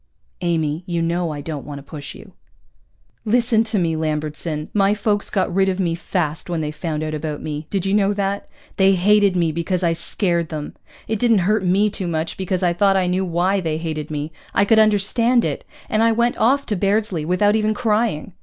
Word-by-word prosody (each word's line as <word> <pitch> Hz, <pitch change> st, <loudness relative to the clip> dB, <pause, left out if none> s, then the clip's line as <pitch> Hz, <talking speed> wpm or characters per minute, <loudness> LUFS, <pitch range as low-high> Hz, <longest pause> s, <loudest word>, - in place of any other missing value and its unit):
_" -, -, -43 dB, 0.4 s
"Amy, 160 Hz, -3 st, 0 dB
you 170 Hz, -1 st, -1 dB
know 170 Hz, +1 st, 0 dB
I 150 Hz, -2 st, -5 dB
don't 150 Hz, -2 st, -5 dB
want 145 Hz, -1 st, -7 dB
to 140 Hz, -, -9 dB
push 145 Hz, -1 st, -8 dB
you." -, -, -14 dB, 0.9 s
"Listen 230 Hz, 0 st, +2 dB
to 220 Hz, -1 st, -1 dB
me, 165 Hz, -3 st, +1 dB
Lambertson. 155 Hz, 0 st, -3 dB
My 200 Hz, 0 st, +3 dB
folks 205 Hz, -1 st, 0 dB
got 190 Hz, -4 st, 0 dB
rid 190 Hz, +1 st, +3 dB
of 190 Hz, 0 st, -2 dB
me 175 Hz, -3 st, +1 dB
fast 165 Hz, -2 st, -3 dB
when 170 Hz, -2 st, -1 dB
they 150 Hz, -1 st, -2 dB
found 155 Hz, 0 st, -4 dB
out 155 Hz, 0 st, -3 dB
about 150 Hz, -1 st, -4 dB
me. 150 Hz, 0 st, -5 dB
Did 195 Hz, -2 st, -1 dB
you 195 Hz, -, 0 dB
know 205 Hz, -1 st, +3 dB
that? 200 Hz, 0 st, -2 dB, 0.3 s
They 195 Hz, 0 st, +5 dB
hated 200 Hz, +1 st, +4 dB
me 170 Hz, -3 st, +2 dB
because 170 Hz, +3 st, -2 dB
I 170 Hz, -1 st, +3 dB
scared 170 Hz, 0 st, -1 dB
them! 150 Hz, -2 st, -5 dB, 0.3 s
It 220 Hz, -1 st, -1 dB
didn't 225 Hz, -6 st, +3 dB
hurt 210 Hz, 0 st, +2 dB
me 195 Hz, +3 st, +2 dB
too 190 Hz, -3 st, -4 dB
much, 160 Hz, -1 st, -2 dB
because 185 Hz, 0 st, -2 dB
I 175 Hz, -1 st, +3 dB
thought 195 Hz, +2 st, +3 dB
I 185 Hz, -, +2 dB
knew 180 Hz, +1 st, 0 dB
why 185 Hz, +2 st, +1 dB
they 160 Hz, -3 st, -2 dB
hated 155 Hz, -2 st, -4 dB
me, 150 Hz, 0 st, -4 dB, 0.2 s
I 200 Hz, -, +4 dB
could 220 Hz, +2 st, +4 dB
understand 220 Hz, +3 st, +3 dB
it, -, -, -3 dB, 0.2 s
and 215 Hz, -, +1 dB
I 230 Hz, 0 st, +4 dB
went 235 Hz, +1 st, +1 dB
off 275 Hz, +5 st, +2 dB
to 210 Hz, -, -1 dB
Bairdsley 200 Hz, -3 st, 0 dB
without 185 Hz, +6 st, +2 dB
even 215 Hz, 0 st, +1 dB
crying. 215 Hz, -7 st, 0 dB
185 Hz, 215 wpm, -21 LUFS, 160-205 Hz, 0.9 s, They